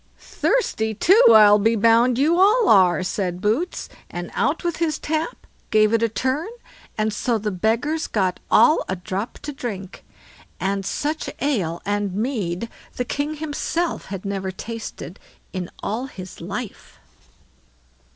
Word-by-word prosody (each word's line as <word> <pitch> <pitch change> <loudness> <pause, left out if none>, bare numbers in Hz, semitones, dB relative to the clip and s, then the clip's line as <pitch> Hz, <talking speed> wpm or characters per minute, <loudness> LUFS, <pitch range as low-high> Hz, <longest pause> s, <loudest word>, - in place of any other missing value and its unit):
"Thirsty, 220 - -1
too, 385 - +5
I'll 210 -1 +8
be 225 +3 +2
bound 230 +3 +4
you 320 +6 +3
all 425 +4 +5
are", 185 -3 +5
said 180 -1 -2
Boots, 225 - -1 0.2
and - - -6
out - - 0
with 345 -2 -1
his 330 -2 0
tap, 315 +8 -3 0.2
gave 215 0 +4
it 230 - +3
a 230 - +2
turn, 260 - -1 0.5
and 215 0 0
so 235 +2 0
the 210 0 -3
beggars 230 - 0
got 185 -4 0
all 310 - +5
a 185 - 0
drop 190 +4 -5
to 295 - -5
drink; 200 -7 -6 0.6
and 195 0 -1
such 305 +2 -2
ale 195 - -1
and 205 -2 -1
mead 215 -4 -2 0.3
the 250 - -2
king 290 +5 -2
himself 315 +3 -2
had 195 0 -7
never 195 -1 -3
tasted 195 -4 -7 0.3
in 185 -2 -4
all 235 +6 -2
his 185 -9 -10
life. 200 +5 -7
220 Hz, 145 wpm, -22 LUFS, 195-290 Hz, 0.6 s, I'll